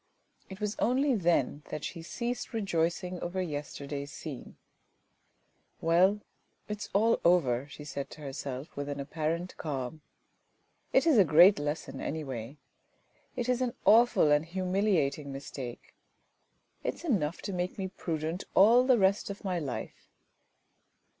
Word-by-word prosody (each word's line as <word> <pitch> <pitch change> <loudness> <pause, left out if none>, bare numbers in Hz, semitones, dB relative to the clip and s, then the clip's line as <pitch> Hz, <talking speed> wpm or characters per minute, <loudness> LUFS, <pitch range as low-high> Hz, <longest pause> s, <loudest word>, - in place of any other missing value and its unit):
It 190 0 -9
was 210 0 -2
only 265 +3 +2
then 170 - +1
that 150 - -5
she 170 - -5
ceased 240 +8 -4
rejoicing 180 -3 -1
over 175 +2 -3
yesterday's 145 -3 -4
scene. 145 -6 -8 0.6
" - - -43
Well, 185 +5 +3 0.5
it 210 -1 -4
is - - -6
all 225 +3 +3
over," 140 -7 +3
she 150 - -10
said 140 -1 -5
to 155 - -12
herself, 135 0 -6
with 145 0 -4
an 145 0 -4
apparent 160 +5 -3
calm. 145 0 -4 0.4
" - - -44
It - - +4
is 305 -9 +5
a - - +8
great 175 +4 +7
lesson, 145 +2 -4
anyway. 135 -4 -5 0.8
It 245 - -2
is 250 0 +1
an 245 -2 -1
awful 225 -8 +6
and 150 +1 +4
humiliating 180 -5 0
mistake! 135 -3 -7 0.9
It - - -1
is - - -14
enough 185 - 0
to 200 - -4
make 180 0 -2
me 190 -2 -2
prudent 165 -1 -3
all 230 +6 +7
the 255 -2 +5
rest 195 0 +2
of 200 - -7
my 180 -2 0
life." 140 -6 -6
170 Hz, 145 wpm, -30 LUFS, 145-200 Hz, 0.9 s, a